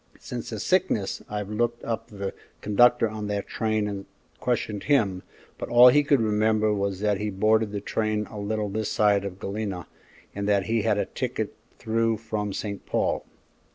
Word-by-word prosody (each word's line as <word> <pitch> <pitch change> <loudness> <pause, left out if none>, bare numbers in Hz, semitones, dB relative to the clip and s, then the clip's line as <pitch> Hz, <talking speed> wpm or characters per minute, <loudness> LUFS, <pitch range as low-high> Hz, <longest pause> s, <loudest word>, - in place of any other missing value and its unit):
Since - - -6
his - - -4
sickness - - +1
I've 105 -1 -4
looked 120 +2 -1
up 115 -2 -3
the 100 -2 -5 0.3
conductor 120 +3 +4
on 110 -1 -5
that 100 -1 -2
train 110 -1 -1
and 100 -1 -5 0.3
questioned 110 -4 -1
him, 105 -11 +2 0.4
but - - -5
all 120 +1 +9
he 145 +4 +5
could 140 -1 +3
remember 110 0 +2
was 100 -1 -2
that 105 -2 +1
he 105 0 -1
boarded 110 +2 +2
the 100 -1 -3
train 110 0 -1
a 105 - -6
little 105 +1 -1
this 105 +1 -2
side 105 -2 +3
of 95 -2 -5
Galena 100 -4 -4 0.5
and 100 0 -3
that 100 -1 +3
he 115 +1 +1
had - - +1
a - - +1
ticket - - -3 0.2
through 115 0 0
from 105 -2 -3
St. 100 0 -4
Paul." - - 0
105 Hz, 180 wpm, -26 LUFS, 100-110 Hz, 0.5 s, all